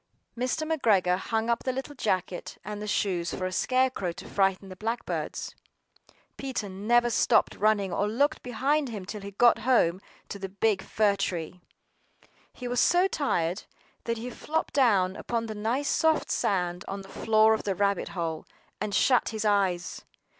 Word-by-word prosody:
MR. 255 Hz, +6 st, -1 dB
McGREGOR 195 Hz, -, +3 dB
hung 225 Hz, +3 st, -1 dB
up 235 Hz, 0 st, +1 dB
the 260 Hz, -, 0 dB
little 265 Hz, +3 st, -5 dB
jacket 185 Hz, -8 st, -2 dB
and 210 Hz, 0 st, -5 dB
the 210 Hz, -, -5 dB
shoes 180 Hz, -5 st, -1 dB
for 185 Hz, -, -3 dB
a 185 Hz, -, -2 dB
scare 255 Hz, +6 st, +2 dB
crow 185 Hz, -8 st, -3 dB
to -, -, -10 dB
frighten 195 Hz, -1 st, 0 dB
the 185 Hz, -, -8 dB
blackbirds. 225 Hz, +5 st, -3 dB, 0.8 s
PETER 260 Hz, -7 st, -4 dB
never 235 Hz, +5 st, +2 dB
stopped -, -, +3 dB
running 205 Hz, -3 st, +1 dB
or 205 Hz, -, +1 dB
looked 285 Hz, +7 st, +1 dB
behind 270 Hz, +4 st, 0 dB
him 205 Hz, -5 st, -6 dB
till 210 Hz, +2 st, -6 dB
he 200 Hz, -, -7 dB
got 230 Hz, +4 st, +4 dB
home 215 Hz, -7 st, +2 dB, 0.3 s
to 200 Hz, -, -7 dB
the 195 Hz, 0 st, -5 dB
big 200 Hz, 0 st, +1 dB
fir 210 Hz, -1 st, +1 dB
tree. 180 Hz, -2 st, -3 dB, 0.9 s
He 250 Hz, -, -7 dB
was 245 Hz, 0 st, 0 dB
so 360 Hz, +2 st, +4 dB
tired 185 Hz, -, -1 dB, 0.4 s
that 230 Hz, 0 st, -1 dB
he 245 Hz, +3 st, -6 dB
flopped 315 Hz, +5 st, -3 dB
down 200 Hz, -9 st, +3 dB
upon 230 Hz, +1 st, -2 dB
the 220 Hz, -, -5 dB
nice 230 Hz, +7 st, -1 dB
soft 320 Hz, -1 st, +2 dB
sand 180 Hz, -2 st, 0 dB
on 195 Hz, 0 st, -4 dB
the -, -, -13 dB
floor 220 Hz, +2 st, +3 dB
of 220 Hz, -, -1 dB
the 195 Hz, -2 st, -2 dB
rabbit 200 Hz, 0 st, 0 dB
hole, 165 Hz, -2 st, -3 dB, 0.3 s
and 210 Hz, 0 st, -2 dB
shut 250 Hz, -3 st, +3 dB
his 220 Hz, -1 st, -3 dB
eyes. 195 Hz, -4 st, 0 dB
210 Hz, 175 wpm, -27 LUFS, 190-245 Hz, 0.9 s, got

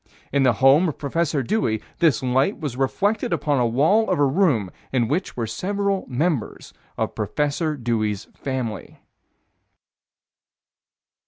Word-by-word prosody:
In 140 Hz, -, +2 dB
the 130 Hz, -2 st, +4 dB
home 140 Hz, +8 st, +5 dB
of 150 Hz, -, -6 dB
Prof. 145 Hz, -2 st, -1 dB
Dewey, 115 Hz, -, 0 dB, 0.2 s
this 155 Hz, -7 st, +3 dB
light 130 Hz, -, +1 dB
was 145 Hz, -8 st, -4 dB
reflected 200 Hz, -, 0 dB
upon 150 Hz, -4 st, +1 dB
a 120 Hz, -, +2 dB
wall 160 Hz, -, +3 dB
of -, -, +1 dB
a 145 Hz, -, +4 dB
room 135 Hz, -, +2 dB, 0.2 s
in 120 Hz, -3 st, +1 dB
which 170 Hz, -, -2 dB
were 115 Hz, -, -1 dB
several 200 Hz, -, -2 dB
members 140 Hz, -1 st, -2 dB, 0.2 s
of -, -, -2 dB
Prof. 145 Hz, -, -2 dB
Dewey's 110 Hz, -3 st, -1 dB
family. 130 Hz, -6 st, -5 dB
140 Hz, 135 wpm, -23 LUFS, 120-170 Hz, 0.2 s, home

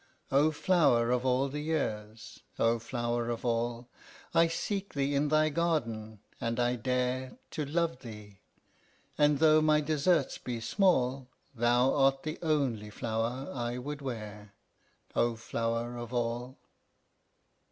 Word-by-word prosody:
"O 140 Hz, +3 st, +5 dB
flower 145 Hz, -8 st, +3 dB
of 125 Hz, +1 st, +1 dB
all 130 Hz, +2 st, +2 dB
the 145 Hz, +2 st, -5 dB
years, 110 Hz, -9 st, -3 dB, 0.2 s
O 115 Hz, 0 st, +2 dB
flower 120 Hz, 0 st, -2 dB
of 120 Hz, +1 st, -3 dB
all! 120 Hz, 0 st, -1 dB, 0.5 s
I 165 Hz, 0 st, +5 dB
seek 195 Hz, +3 st, -3 dB
thee 140 Hz, 0 st, 0 dB
in 140 Hz, +1 st, +2 dB
thy 155 Hz, +1 st, +3 dB
garden, 115 Hz, -11 st, -1 dB, 0.2 s
and 115 Hz, +1 st, -1 dB
I 120 Hz, 0 st, +2 dB
dare 125 Hz, +1 st, -1 dB
To 150 Hz, -, -3 dB
love 160 Hz, -2 st, -1 dB
thee; 105 Hz, -5 st, -11 dB, 0.8 s
and 150 Hz, -1 st, +4 dB
though 155 Hz, +1 st, +5 dB
my 155 Hz, -1 st, +4 dB
deserts 150 Hz, 0 st, +1 dB
be 120 Hz, -2 st, -4 dB
small, 130 Hz, -, +1 dB, 0.2 s
Thou 120 Hz, +2 st, +3 dB
art 135 Hz, -1 st, +3 dB
the 155 Hz, 0 st, -4 dB
only 135 Hz, -10 st, 0 dB
flower 115 Hz, +5 st, -3 dB
I 120 Hz, -1 st, -3 dB
would 145 Hz, +3 st, -5 dB
wear, 105 Hz, -5 st, -7 dB, 0.6 s
O 120 Hz, 0 st, +2 dB
flower 115 Hz, +1 st, -2 dB
of 120 Hz, 0 st, -7 dB
all!" 120 Hz, +2 st, -2 dB
125 Hz, 135 wpm, -30 LUFS, 115-150 Hz, 0.8 s, O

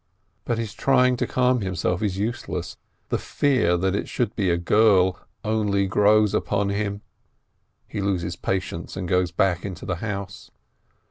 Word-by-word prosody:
But 120 Hz, -, -1 dB
his 115 Hz, -2 st, -4 dB
trying 125 Hz, -2 st, +3 dB
to -, -, -1 dB
calm 125 Hz, -1 st, +2 dB
himself 90 Hz, -2 st, -1 dB
is 100 Hz, -3 st, -1 dB
useless; 100 Hz, -, -3 dB, 0.3 s
the -, -, 0 dB
fear 120 Hz, -12 st, +1 dB
that 95 Hz, +2 st, 0 dB
it -, -, -3 dB
should 120 Hz, -, -1 dB
be 100 Hz, -4 st, +1 dB
a 85 Hz, -, +2 dB
girl 95 Hz, 0 st, +3 dB, 0.2 s
only 105 Hz, -2 st, +1 dB
grows 105 Hz, +1 st, +3 dB
upon 100 Hz, -1 st, 0 dB
him. 100 Hz, 0 st, -2 dB, 0.8 s
He 105 Hz, -, -4 dB
loses 90 Hz, -4 st, -1 dB
patience, 90 Hz, -1 st, -3 dB
and 90 Hz, -1 st, -3 dB
goes 90 Hz, 0 st, +2 dB
back 90 Hz, -1 st, +1 dB
into 95 Hz, -4 st, -6 dB
the 90 Hz, -3 st, -2 dB
house. 100 Hz, -1 st, -6 dB
100 Hz, 155 wpm, -24 LUFS, 90-110 Hz, 0.8 s, trying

